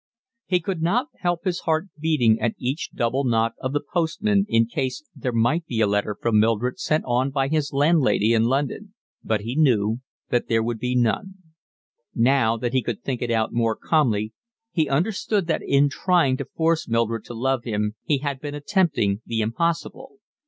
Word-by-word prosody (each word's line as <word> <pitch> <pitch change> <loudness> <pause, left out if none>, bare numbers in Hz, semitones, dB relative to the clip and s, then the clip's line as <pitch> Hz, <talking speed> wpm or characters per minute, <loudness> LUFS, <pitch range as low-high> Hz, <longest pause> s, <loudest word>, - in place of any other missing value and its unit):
He 180 -1 +2
could 175 0 -4
not 235 - +1
help 175 -1 -1
his 180 -2 0
heart 160 +4 -1
beating 140 -8 +3
at 120 - 0
each 130 +5 -3
double 125 +4 0
knock 115 -2 +1
of 130 - -3
the 145 +1 -1
postman 195 +4 +1
in 115 0 +4
case 130 +4 -3
there 125 - -3
might 120 +9 +1
be 115 - -2
a 110 - +4
letter 105 0 -1
from 115 -2 +2
Mildred 115 +3 +1
sent 155 0 0
on 125 +2 +1
by 135 0 0
his 155 -1 0
landlady 140 -7 +3
in 115 0 +3
London; 145 - -2 0.3
but 110 -2 0
he 115 +5 -4
knew 115 -7 +2 0.3
that 120 - 0
there 115 -1 +2
would 115 -1 -3
be 125 +2 -1
none. 125 - 0 0.8
Now 115 -1 +3
that 120 +2 -3
he 130 - +3
could 120 -3 -5
think 130 -3 -3
it 120 - -2
out 110 -1 0
more 115 -1 +1
calmly 110 -9 +1 0.4
he 160 -4 0
understood 195 +5 0
that 165 - -1
in 140 +1 +3
trying 160 -2 +2
to - - -4
force 165 0 0
Mildred 115 -1 0
to 120 - -8
love 130 +1 0
him 105 -3 -2
he 145 - +1
had 140 -1 -4
been 145 -1 -5
attempting 145 - +1
the 115 -1 -1
impossible. 165 - -2
130 Hz, 190 wpm, -23 LUFS, 115-160 Hz, 0.8 s, in